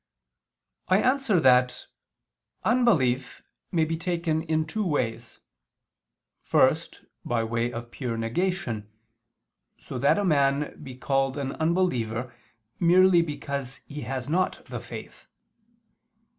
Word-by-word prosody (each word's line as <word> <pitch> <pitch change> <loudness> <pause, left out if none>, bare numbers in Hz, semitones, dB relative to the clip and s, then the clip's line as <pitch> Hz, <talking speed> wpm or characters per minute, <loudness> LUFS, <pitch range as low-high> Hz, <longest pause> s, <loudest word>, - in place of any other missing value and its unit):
I 185 - +4
answer 255 -6 +2
that, 125 -2 +4 0.8
Unbelief 155 - +2 0.3
may 165 -3 +2
be 165 +1 -2
taken 165 -2 -1
in 160 -1 0
two 215 +7 -2
ways: 120 - -2 1.0
first, - - +1 0.2
by 115 -1 0
way 115 +1 -1
of 120 0 -7
pure 120 -4 -4
negation, 115 - -2 0.9
so 125 - -7
that 140 +8 +3
a 205 - 0
man 140 -3 +1
be 130 -3 -8
called 135 +1 0
an 135 -2 -2
unbeliever, 130 -9 -1 0.5
merely 180 +1 +5
because 140 -4 -4
he 150 0 -7
has 130 -1 -4
not 180 +5 0
the - - -6
faith. - - -10
140 Hz, 115 wpm, -26 LUFS, 125-175 Hz, 1.0 s, merely